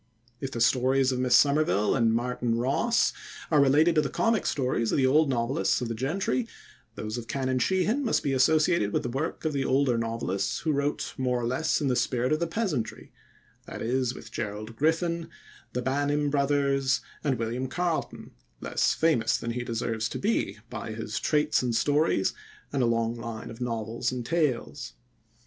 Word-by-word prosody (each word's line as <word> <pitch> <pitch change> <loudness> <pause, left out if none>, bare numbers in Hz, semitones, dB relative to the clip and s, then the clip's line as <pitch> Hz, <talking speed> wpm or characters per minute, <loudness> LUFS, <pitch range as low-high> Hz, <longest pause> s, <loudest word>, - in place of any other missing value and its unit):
If 135 - -4
the 120 -3 -4
stories 130 +3 +3
of 125 - -2
Miss 125 -1 +3
Somerville 140 -8 +3
and 115 -3 +3
"Martin 120 0 0
Ross" 140 - +2 0.4
are 150 -2 +5
related 150 +5 +4
to 155 - +4
the 145 - -2
comic 225 -1 +1
stories 125 -4 0
of - - +1
the 135 - +3
old 150 +3 +4
novelists 130 +4 +1
of 125 -2 -3
the - - -1
gentry, 130 - -1 0.5
those 110 +2 -4
of 115 - -9
Canon 130 -1 -1
Sheehan 190 - +1
must 235 - +1
be 140 - 0
associated 150 - +3
with - - 0
the 120 - -3
work 145 +5 -3
of 155 - 0
the 140 -1 0
older 130 -3 +2
novelists 115 -4 -2
who 160 - 0
wrote 140 0 -1
more 125 -1 +1
or 120 - -2
less 130 +7 0
in 145 - +1
the 125 - +2
spirit 125 +2 +1
of 155 - +1
the 170 - 0
peasantry, 165 - -3 0.6
that - - -6
is, 125 +1 0
with - - -11
Gerald 110 0 -5
Griffin, 165 +4 0 0.4
the 125 - -2
Banim 145 +2 0
brothers, 140 -2 +1 0.2
and 140 -4 +1
William 120 +3 -2
Carleton, 175 +3 -3 0.3
less - - 0
famous 125 -9 +2
than 115 - -4
he 120 +1 -3
deserves 115 -1 -2
to - - -4
be 200 - 0
by 110 - -5
his 110 -1 -4
Traits 150 +3 +2
and 120 -2 -1
Stories 145 -7 +2 0.4
and 140 - +1
a 120 - +3
long 115 0 +1
line 115 -2 -7
of 115 +2 -11
novels 115 0 -2
and 125 -2 -4
tales. 140 -4 -1
130 Hz, 185 wpm, -27 LUFS, 115-150 Hz, 0.6 s, are